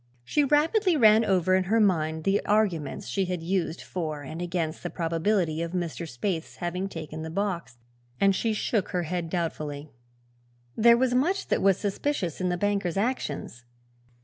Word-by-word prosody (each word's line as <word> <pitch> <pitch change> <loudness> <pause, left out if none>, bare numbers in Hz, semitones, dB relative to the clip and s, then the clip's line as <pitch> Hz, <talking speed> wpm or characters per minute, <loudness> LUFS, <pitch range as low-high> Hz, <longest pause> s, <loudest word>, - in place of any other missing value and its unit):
She 295 - +1
rapidly 320 - +3
ran 220 -3 +6
over 185 -3 +2
in 185 0 +3
her 220 +5 +2
mind 160 -6 +1
the 195 +3 +1
arguments 190 -9 0
she 195 -1 0
had 180 -2 -3
used 180 -1 -1
for 155 -5 -4
and 155 +5 -7
against 170 -2 -2
the 175 - -4
probability 165 0 0
of 170 +1 -4
Mr. 170 -2 -3
Spaythe's 160 +6 -3
having 180 +3 -3
taken 155 -2 -7
the 160 - -5
box, 175 -7 -3 0.4
and 195 -1 +4
shook 215 -1 0
her 180 -1 -1
head 170 0 -3
doubtfully. 155 -4 -3 0.8
There 235 +1 +6
was 250 0 +2
much 340 +10 +1
that - - +1
was 195 -1 +4
suspicious 200 - -2
in 180 - +1
the 180 - 0
banker's 195 -2 0
actions. 200 - -2
180 Hz, 165 wpm, -27 LUFS, 165-210 Hz, 0.8 s, ran